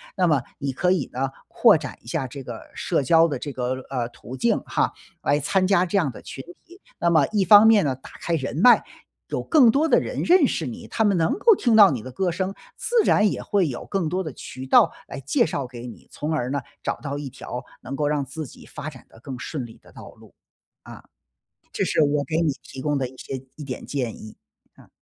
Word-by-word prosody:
那 185 Hz, -2 st, +2 dB
么 145 Hz, -6 st, +2 dB, 0.2 s
你 140 Hz, 0 st, -2 dB
可 180 Hz, +7 st, +1 dB
以 175 Hz, -8 st, 0 dB
呢， 130 Hz, +2 st, -2 dB, 0.2 s
扩 230 Hz, -4 st, +5 dB
展 150 Hz, -5 st, -5 dB
一 -, -, -18 dB
下 135 Hz, +1 st, -2 dB
这 135 Hz, +2 st, -9 dB
个 120 Hz, -2 st, -7 dB
社 165 Hz, -, 0 dB
交 165 Hz, +5 st, +5 dB
的 145 Hz, -5 st, -3 dB
这 145 Hz, -, -5 dB
个， 130 Hz, 0 st, -3 dB
呃， 125 Hz, -3 st, -2 dB
途 125 Hz, +2 st, -10 dB
径 120 Hz, -, +2 dB
哈， -, -, 0 dB, 0.3 s
来 145 Hz, +1 st, +2 dB
参 185 Hz, +6 st, +1 dB
加 185 Hz, -1 st, +3 dB
这 200 Hz, -, 0 dB
样 160 Hz, -8 st, +1 dB
的 -, -, -12 dB
群 135 Hz, -, -8 dB, 0.2 s
体。 355 Hz, +2 st, -17 dB, 0.2 s
那 170 Hz, -, +2 dB
么 160 Hz, -4 st, +4 dB
一 210 Hz, -2 st, +2 dB
方 205 Hz, +2 st, +8 dB
面 220 Hz, -3 st, +6 dB
呢， 135 Hz, -2 st, 0 dB
打 135 Hz, -, -14 dB
开 170 Hz, -, 0 dB
人 140 Hz, -3 st, -3 dB
脉， 240 Hz, +8 st, +6 dB, 0.5 s
有 -, -, -2 dB
更 285 Hz, -8 st, +5 dB
多 290 Hz, +7 st, +3 dB
的 -, -, +5 dB
人 -, -, -4 dB
认 345 Hz, -5 st, +5 dB
识 160 Hz, -, -2 dB
你， 120 Hz, -, -7 dB
他 225 Hz, -, 0 dB
们 205 Hz, -3 st, +3 dB
能 165 Hz, +9 st, +2 dB
够 450 Hz, +1 st, +5 dB
听 240 Hz, -9 st, +2 dB
到 205 Hz, -3 st, +8 dB
你 125 Hz, -5 st, -3 dB
的 130 Hz, -, -9 dB
歌 180 Hz, +7 st, -1 dB
声， 190 Hz, +3 st, -2 dB, 0.2 s
自 -, -, -4 dB
然 210 Hz, 0 st, +4 dB
也 -, -, -4 dB
会 195 Hz, -4 st, +1 dB
有 125 Hz, -4 st, -6 dB
更 190 Hz, -5 st, -1 dB
多 185 Hz, +3 st, -1 dB
的 155 Hz, -5 st, -6 dB
渠 130 Hz, +2 st, -9 dB
道 130 Hz, -, +5 dB, 0.2 s
来 135 Hz, -, -7 dB
介 140 Hz, +1 st, +1 dB
绍 140 Hz, -4 st, -3 dB
给 120 Hz, -1 st, -9 dB
你， 120 Hz, -, -12 dB
从 155 Hz, +2 st, -3 dB
而 125 Hz, -5 st, -1 dB
呢， 140 Hz, +1 st, -1 dB, 0.2 s
找 -, -, -1 dB
到 140 Hz, -1 st, -5 dB
一 145 Hz, -2 st, -5 dB
条 125 Hz, -1 st, -7 dB, 0.2 s
能 135 Hz, -, -6 dB
够 145 Hz, +1 st, 0 dB
让 145 Hz, -2 st, 0 dB
自 155 Hz, +3 st, -6 dB
己 -, -, -15 dB
发 155 Hz, -, -7 dB
展 130 Hz, -5 st, -14 dB
地 -, -, -19 dB
更 130 Hz, +1 st, -7 dB
顺 130 Hz, +1 st, -5 dB
利 115 Hz, -, -15 dB
的 -, -, -19 dB
道 -, -, -11 dB
路。 -, -, -19 dB, 0.5 s
啊， -, -, -12 dB, 0.7 s
这 -, -, 0 dB
是 -, -, +1 dB
我 145 Hz, 0 st, +1 dB
给 160 Hz, +2 st, -1 dB
你 160 Hz, -4 st, +2 dB
提 135 Hz, -, -10 dB
供 145 Hz, +1 st, 0 dB
的 130 Hz, -2 st, -2 dB
一 130 Hz, -, -16 dB
些 130 Hz, -1 st, -6 dB
一 150 Hz, -, -8 dB
点 130 Hz, -2 st, -6 dB
建 125 Hz, -6 st, -3 dB
议， 110 Hz, -, -11 dB, 0.4 s
嗯。 -, -, -18 dB
150 Hz, 260 characters per minute, -23 LUFS, 130-185 Hz, 0.7 s, 方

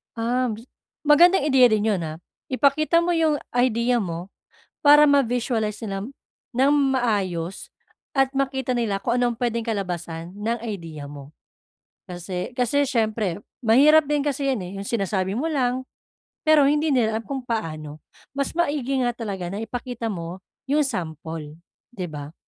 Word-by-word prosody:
Ah, 245 Hz, +2 st, 0 dB
m 235 Hz, -, -1 dB
s 215 Hz, -, -9 dB, 0.4 s
magandang 340 Hz, +5 st, +6 dB
ideya 270 Hz, -3 st, +5 dB
din 215 Hz, +1 st, +2 dB
'yun, 195 Hz, -4 st, 0 dB
ah, 155 Hz, +1 st, -7 dB, 0.2 s
ipakita 305 Hz, +5 st, +2 dB
mo 345 Hz, -, -1 dB
'yung 310 Hz, -3 st, +2 dB, 0.2 s
idea 245 Hz, 0 st, +2 dB
mo, 175 Hz, -3 st, -4 dB, 0.5 s
para 295 Hz, 0 st, +8 dB
ma-visualize 245 Hz, -6 st, +1 dB
nila 195 Hz, -1 st, -3 dB, 0.5 s
ng 265 Hz, +3 st, +3 dB, 0.2 s
maayos 195 Hz, -8 st, -2 dB, 0.4 s
at 270 Hz, -1 st, +2 dB
makita 265 Hz, -2 st, -1 dB
nila 220 Hz, -5 st, 0 dB
kung 235 Hz, +4 st, -1 dB
ano'ng 245 Hz, -1 st, +1 dB
puwedeng 235 Hz, -2 st, -1 dB
kalabasan 175 Hz, -4 st, -4 dB
ng 225 Hz, +3 st, -2 dB
idea 165 Hz, -8 st, -6 dB
mo. 140 Hz, 0 st, -10 dB, 0.8 s
Kasi 180 Hz, +3 st, -5 dB
kasi 255 Hz, +4 st, +2 dB
siyempre 220 Hz, -7 st, 0 dB, 0.2 s
mahirap 290 Hz, +8 st, +6 dB
din 295 Hz, 0 st, +2 dB
kasi 280 Hz, -1 st, -1 dB
'yan 255 Hz, -, -1 dB
eh, -, -, -8 dB
'yung 200 Hz, -, -6 dB
sinasabi 195 Hz, -4 st, -1 dB
mo 280 Hz, +8 st, -1 dB
lang, 255 Hz, -3 st, 0 dB, 0.6 s
pero 305 Hz, -3 st, +6 dB
hindi 300 Hz, +2 st, +2 dB
nila 220 Hz, -5 st, +2 dB
alam -, -, -9 dB
kung 270 Hz, -2 st, -4 dB
paano. 155 Hz, -, -4 dB, 0.4 s
Mas 280 Hz, 0 st, -1 dB
maigi 285 Hz, -5 st, 0 dB
nga 240 Hz, -, +1 dB
talaga 200 Hz, -6 st, -4 dB
na 205 Hz, +3 st, -4 dB
ipakita 240 Hz, 0 st, -4 dB
mo 170 Hz, -1 st, -6 dB, 0.3 s
'yung 295 Hz, +2 st, +3 dB
sample, 160 Hz, -, -5 dB, 0.4 s
'di 185 Hz, -4 st, -4 dB
ba? 145 Hz, 0 st, -7 dB
235 Hz, 150 wpm, -23 LUFS, 190-270 Hz, 0.8 s, para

